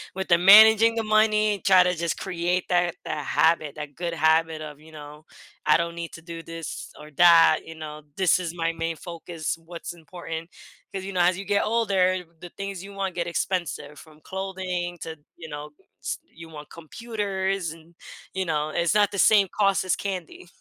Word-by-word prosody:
with 190 -2 -4
'em 170 +1 +4
managing 220 +2 +8
the 225 - -1
money 215 0 +3
and 200 - -12
try 185 -2 +6
to 180 0 +1
just 170 0 -2
create 180 -1 -1
that 175 -1 +1
that 150 -2 -4
habit, 160 -3 +2
that 150 -1 -7
good 170 0 -3
habit 160 0 +2
of, 150 -1 -9
you 160 +1 -16
know, 150 0 -11 0.4
"I 150 - +6
don't 170 0 -2
need 170 -1 -6
to 165 - -11
do 170 -1 -8
this 165 -1 -7
or 150 0 -12
that," 170 -1 +7
you 165 - -10
know, 155 -1 -8 0.2
"This 185 -1 +3
is 175 -2 -5
my 165 -1 0
main 165 0 -3
focus, 170 -1 -5
what's 170 0 -7
important." 165 -1 -8 0.4
'Cause, 190 -1 -4
you 195 - -6
know, 180 - -1
as 180 +1 +3
you 195 - -6
get 200 0 +1
older, 195 -5 +1 0.2
the 175 - -10
things 195 -2 -5
you 200 0 -10
want 195 -2 -3
get 170 -1 -2
expensive 170 -4 -3
from 155 -1 -16
clothing 185 -2 -4
to 160 -1 -6 0.2
you 165 - -9
know, 150 0 -7 0.3
s - - -3 0.2
you 165 0 -12
want 150 -2 -11
computers, 195 0 -3
and, 165 +1 -15 0.4
you 190 0 -2
know, 155 -2 -1
it's 170 +5 0
not 205 -1 +4
the 200 - -4
same 200 -1 +5
cost 195 -2 +3
as 185 - +1
candy. 185 -3 -6
175 Hz, 200 wpm, -25 LUFS, 160-190 Hz, 0.4 s, managing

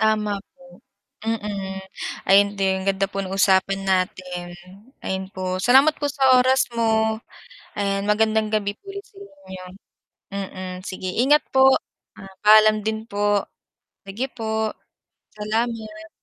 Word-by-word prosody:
Tama 210 -2 +1 0.2
po, 180 +3 -18 0.5
mm, 200 -3 -3 0.5
ayon 200 +1 +5
din, 190 0 0
ganda 195 0 +1
po 195 0 -4
ng 190 0 -4
usapan 195 0 +2
natin, 185 -2 -2 0.5
ayon 190 0 -3
po, 185 -1 -4
salamat 265 +8 +5
po 290 - 0
sa 265 -2 +4
oras 260 +1 +3
mo, 220 -1 +1 0.6
ayan, 195 -1 0
magandang 220 0 +2
gabi 210 -1 -1
po 395 - -16
ulit 400 0 -7
sa - - -26
inyo, 290 - -11 0.7
mm, 185 -2 -6
sige 185 0 -6
ingat 295 +3 +4
po. 265 0 +7 0.7
Paalam 215 0 +6
din 220 +1 -3
po, 205 0 +1 0.7
sige 215 +7 -3
po. 220 -1 -2 0.6
Salamat. 215 0 -3
210 Hz, 125 wpm, -22 LUFS, 190-220 Hz, 0.7 s, po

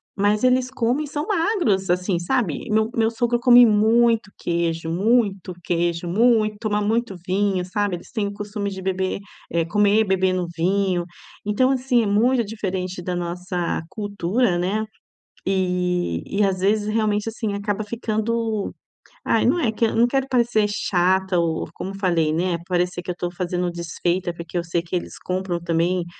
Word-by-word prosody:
mas 205 +1 +2
eles 255 0 +2
comem 255 +3 0
e - - -6
são 295 +2 -4
magros 335 - +1
assim, 180 +1 +1
sabe? 185 - -1
O - - +1
meu 220 0 +2
meu 225 -1 +2
sogro 240 +1 +1
come 245 -1 +8
muito 225 0 +3
queijo, 165 -1 -1
muito 195 0 +1
queijo, 170 0 0
muito, 215 +2 +3
toma 210 -2 0
muito, 220 -1 0
vinho, 190 0 +1
sabe? 200 +1 -1
Eles - - -15
têm 215 -3 0
o 200 - -5
costume 205 0 -4
de 190 -1 -7
beber, 190 0 -1 0.3
eh, 170 -1 +1
comer 205 +4 +3
bebendo 185 -2 +1
um - - -8
vinho. 185 +1 +1 0.4
Então, 235 +6 +2
assim, 255 -2 +2
é - - -1
muito 235 +5 +3
diferente 190 -4 -4
da 180 +1 -3
nossa 175 0 -3
cultura 205 0 0
né. 195 +5 -1 0.6
E, 180 - 0 0.2
e 210 - +4
às 190 -2 0
vezes 205 +2 +2
realmente 215 -1 0
assim 220 -2 -3
acaba 205 +1 -2
ficando, 220 0 -2 0.5
ai - - +2
não 350 - +3
é 240 -9 +1
que 225 +1 +1
não 230 +2 +3
quero 270 +1 0
parecer 235 -4 +2
chata 190 -2 +1
ou 165 -2 0
como 195 +1 -5
falei 170 -5 +1
né 175 +1 0
parecer 180 -1 -1
que 180 - -3
eu - - -3
estou 175 0 -3
fazendo 180 0 -2
desfeita, 175 +1 -2
porque 170 +1 -6
eu 170 - 0
sei 170 0 -1
que 170 +2 -5
eles 175 - -4
compram 185 -1 -2
também 170 +1 0
200 Hz, 170 wpm, -22 LUFS, 180-220 Hz, 0.6 s, come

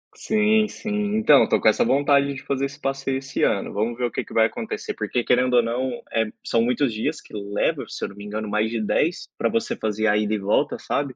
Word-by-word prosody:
Sim, 215 0 +2
sim. 215 - -7 0.3
Então, 185 -10 +6
eu - - +5
estou - - +1
com - - +6
essa 110 - +2
vontade 140 0 +3
de 130 - -9
fazer 140 0 -1
esse 140 +1 -7
passeio 135 -1 -2
esse 135 0 -3
ano. 100 - +1
Vamos 110 +3 -1
ver 125 - -4
o 120 - -2
que - - -3
que - - -12
vai 110 0 +5
acontecer, - - -5
porque 115 +3 -2
querendo 125 0 +2
ou 120 - +5
não, 125 +3 -1 0.2
é, 115 0 +1 0.2
são 115 - +1
muitos 125 +1 +1
dias 150 +8 -2
que - - -19
leva, 100 0 -1
se - - -7
eu - - -2
não 100 - -13
me 100 - -9
engano 105 0 -4
mais 105 +1 +1
de 115 -1 -2
10 160 - 0
para - - +1
você 230 +1 -1
fazer 110 0 -1
a 105 0 +3
ida 105 0 0
e - - +1
volta, 105 +9 0
sabe. 140 -2 -2
125 Hz, 255 wpm, -23 LUFS, 110-140 Hz, 0.3 s, Então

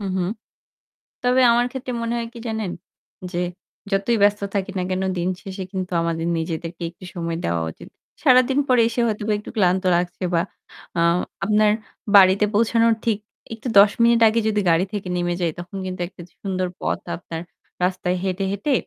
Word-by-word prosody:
হু, - - -5
হু। 185 - +1 1.0
তবে 250 +1 +4
আমার 240 +1 +3
ক্ষেত্রে 260 -1 -5
মনে 230 0 -1
হয় 230 -1 -3
কি 235 - -9
জানেন? 220 -5 -2 0.6
যে 175 - -4 0.5
যতই 200 +4 +2
ব্যস্ত 205 0 +4
থাকি 195 0 -1
না 185 - 0
কেন 185 +1 -1
দিন 175 +1 0
শেষে 190 -1 -6
কিন্তু 185 -1 -4
আমাদের 165 0 -1
নিজেদেরকে 165 +1 -4
একটু 175 +2 -14
সময় 165 -1 -2
দেওয়া 85 0 0
উচিত। - - -13 0.3
সারাদিন 255 +2 +5
পরে 250 -2 +5
এসে 235 +1 -3
হয়তোবা 215 -1 -1
একটু 210 - -10
ক্লান্ত 185 -2 +2
লাগছে 175 +2 -2
বা 165 - +3 0.6
আ - - +2 0.5
আপনার 210 0 +4 0.4
বাড়িতে 195 +1 +7
পৌঁছানোর 230 +1 +3
ঠিক 220 -3 +2 0.4
একটু 225 +3 -7
১০ 200 +1 +8
মিনিট 235 0 +5
আগে 225 +2 +2
যদি 215 -1 +1
গাড়ি 165 +3 +3
থেকে 200 -3 -4
নেমে 175 0 0
যাই 170 - +1
তখন 175 +3 -7
কিন্তু 185 -1 -5
একটা 180 - -13 0.2
সুন্দর 185 -2 -1
পথ - - -1 0.2
আপনার 165 -1 -7 0.4
রাস্তায় 180 0 0
হেঁটে, 190 0 -1
হেঁটে 200 +9 -2
195 Hz, 175 wpm, -22 LUFS, 180-225 Hz, 1.0 s, ১০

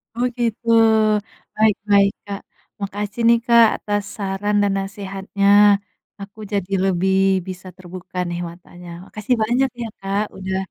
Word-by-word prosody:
Oh 245 +1 +1
gitu 230 0 -2 0.9
baik 215 -1 +3
baik 200 -1 +5
Kak 200 -1 -5 0.4
makasih 205 +3 -4
nih 235 0 +6
Kak 235 -1 +6
atas 205 -1 -2
saran 200 +1 -2
dan 200 - +1
nasehatnya, 195 0 -3 0.7
aku 200 +2 -11
jadi 195 -1 -2
lebih 190 0 +1 0.3
bisa 185 0 -8
terbuka 185 0 -10
nih 175 - -4
matanya 175 0 -13 0.2
makasih 215 +5 -2
banyak 250 +4 +1
ya 230 - -3
Kak 195 +1 -1
udah, 190 0 -3
200 Hz, 135 wpm, -20 LUFS, 190-215 Hz, 0.9 s, nih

